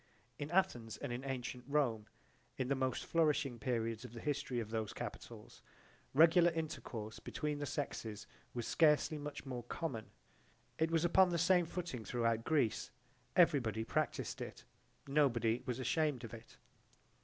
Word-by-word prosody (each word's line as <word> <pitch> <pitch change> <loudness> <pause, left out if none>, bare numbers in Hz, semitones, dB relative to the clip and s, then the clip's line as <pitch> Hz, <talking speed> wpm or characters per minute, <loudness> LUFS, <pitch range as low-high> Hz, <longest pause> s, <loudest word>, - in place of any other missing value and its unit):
In 145 0 -3
Athens 120 - +1
and 120 - -4
in 125 +2 -4
antient 125 -2 -4
Rome 125 -7 +1 0.5
in 130 -1 -1
the - - +4
most 130 -2 -1
flourishing 145 -6 +2
periods 115 -1 -1
of 125 -2 -9
the 115 - -7
history 145 -2 -1
of 110 -2 -5
those 110 -2 -2
capitals, - - -8 0.5
regular 170 +3 +7
intercourse 120 -9 -4
between 150 -1 -3
the 145 - -3
sexes 110 -8 -4 0.3
was 120 -2 -2
scarcely 155 -1 +3
much 145 0 -6
more 125 -2 -4
common. 120 -2 -4 0.7
It 160 0 +3
was 165 0 +2
upon 185 +2 +6
the 170 - 0
same 175 +1 +4
footing 165 -10 -4
throughout 115 0 0
Greece: 145 -9 +1 0.5
everybody 135 -11 +4
practised - - -1
it; - - -7 0.4
nobody 125 -5 +2
was 125 -2 -1
ashamed 145 0 0
of 115 - -7
it. 115 0 -11
130 Hz, 150 wpm, -36 LUFS, 115-155 Hz, 0.7 s, regular